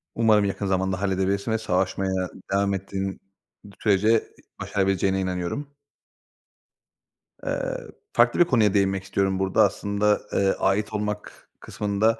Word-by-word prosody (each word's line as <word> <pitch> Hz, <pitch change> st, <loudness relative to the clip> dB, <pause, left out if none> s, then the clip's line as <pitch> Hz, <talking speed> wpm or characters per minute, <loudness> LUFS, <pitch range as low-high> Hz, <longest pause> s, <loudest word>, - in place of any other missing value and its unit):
Umarım 110 Hz, -3 st, +4 dB
yakın 100 Hz, +1 st, -2 dB
zamanda 95 Hz, 0 st, 0 dB
halledebilirsin 100 Hz, +2 st, 0 dB
ve 110 Hz, -, +2 dB
savaşmaya 95 Hz, -2 st, -1 dB, 0.2 s
devam 100 Hz, 0 st, +2 dB
ettiğin 95 Hz, 0 st, -4 dB, 0.6 s
sürece 105 Hz, +2 st, +3 dB, 0.4 s
başarabileceğine 95 Hz, -1 st, 0 dB
inanıyorum. 90 Hz, +9 st, -3 dB, 1.8 s
Eee, -, -, -2 dB, 0.4 s
farklı -, -, +3 dB
bir 175 Hz, -, +7 dB
konuya 115 Hz, -, +3 dB
değinmek 95 Hz, -1 st, +1 dB
istiyorum 95 Hz, 0 st, 0 dB
burada 95 Hz, -1 st, +3 dB
aslında, 105 Hz, +1 st, +1 dB
eee, 100 Hz, -1 st, +3 dB
ait 105 Hz, +3 st, +1 dB
olmak 105 Hz, 0 st, -5 dB
kısmında 105 Hz, +2 st, 0 dB
100 Hz, 115 wpm, -25 LUFS, 95-105 Hz, 1.8 s, bir